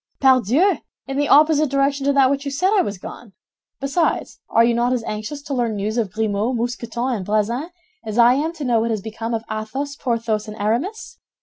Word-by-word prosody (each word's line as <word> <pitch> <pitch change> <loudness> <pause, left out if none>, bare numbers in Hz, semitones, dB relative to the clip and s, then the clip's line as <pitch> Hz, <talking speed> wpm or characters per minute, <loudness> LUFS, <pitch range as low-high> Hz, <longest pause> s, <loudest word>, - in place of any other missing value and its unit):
"Pardieu! 265 - +4 0.3
In 270 0 -4
the 290 0 +1
opposite 305 0 +5
direction 275 0 +1
to 280 - +3
that 270 -1 +4
which 280 0 -1
you 285 - -3
said 365 +8 +1
I 395 - +5
was 205 - -3
gone. 205 +3 -10 0.5
Besides, 280 +5 -1
are 230 - +4
you 235 0 +3
not 240 +2 +1
as 245 -3 -1
anxious 215 +8 -5
to 280 - -5
learn 240 -4 0
news 210 +2 -2
of 225 -6 -1
Grimaud, 220 +3 -1
Mousqueton, 240 +1 -2
and 195 - -5
Bazin 215 - -1 0.3
as 215 +1 -5
I 240 +1 +7
am 300 +5 0
to 310 -4 -6
know 240 -2 +3
what 230 +1 0
has 220 -3 -1
become 225 +2 -4
of 225 - -4
Athos, 265 +7 -4
Porthos, 230 -5 -1
and 215 0 -8
Aramis?" 275 - -2
240 Hz, 210 wpm, -21 LUFS, 220-280 Hz, 0.5 s, I